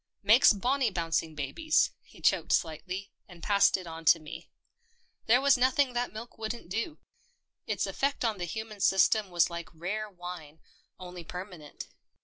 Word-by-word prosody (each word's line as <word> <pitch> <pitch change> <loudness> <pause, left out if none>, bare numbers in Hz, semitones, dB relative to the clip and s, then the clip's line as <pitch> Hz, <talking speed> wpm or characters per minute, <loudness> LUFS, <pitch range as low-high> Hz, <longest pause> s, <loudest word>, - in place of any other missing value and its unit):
Makes 220 +6 +7
bonny 250 +5 +1
bouncing 165 -3 -2
babies." 310 - +1
He - - -19
choked - - +2
slightly, 185 +5 -2 0.2
and 175 -3 -14
passed 200 -1 +4
it 185 - -9
on 165 -1 -8
to 165 - +6
me. 155 -1 -10 0.8
There 240 +3 +6
was 275 -2 +4
nothing 260 +1 +2
that 245 0 -1
milk 220 +2 -10
wouldn't 220 -3 -5
do. 230 - -3 0.7
Its - - -1
effect 275 -2 -1
on 220 -4 -1
the 175 - -2
human 215 +4 -6
system 195 +2 +3
was 175 -1 +2
like 170 0 -6
rare 205 +6 -4
wine, 175 -5 -9 0.4
only 180 -1 -8
per 180 +3 -6
manent. 160 -7 -10
195 Hz, 160 wpm, -29 LUFS, 170-225 Hz, 0.8 s, Makes